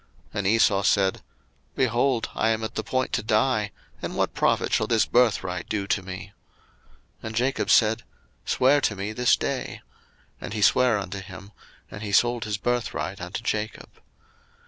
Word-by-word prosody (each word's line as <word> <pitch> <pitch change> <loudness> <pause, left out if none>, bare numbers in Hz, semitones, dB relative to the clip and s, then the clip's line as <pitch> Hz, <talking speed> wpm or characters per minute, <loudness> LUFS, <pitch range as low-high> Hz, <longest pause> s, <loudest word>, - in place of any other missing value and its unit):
01:025:032 - - -6
And 95 - -1
Esau 100 -2 +4
said, 95 -1 +2 0.5
Behold, 125 -1 +1
I 110 - +1
am 110 0 0
at 110 - -4
the 110 - -3
point 130 +4 -1
to - - +1
die: 110 0 +1 0.3
and - - -5
what - - 0
profit - - +1
shall - - +2
this 115 -2 +3
birthright 95 -7 +1
do 100 -2 -1
to 100 - 0
me? 95 +1 -8 0.9
01:025:033 - - -6
And 110 - -6
Jacob 125 +3 0
said, 110 0 +4 0.4
Swear 140 +3 +3
to 105 - 0
me 100 +2 -4
this 125 +1 +3
day; - - -4 0.6
and - - -6
he 105 -2 -1
sware 125 -1 +4
unto 100 0 -5
him: 95 +1 -11 0.4
and 105 - -8
he 105 -2 -4
sold 120 +3 +2
his 105 -1 -2
birthright 100 -6 -2
unto 90 +5 -5
Jacob. 110 -2 -3
110 Hz, 170 wpm, -25 LUFS, 100-120 Hz, 0.9 s, Esau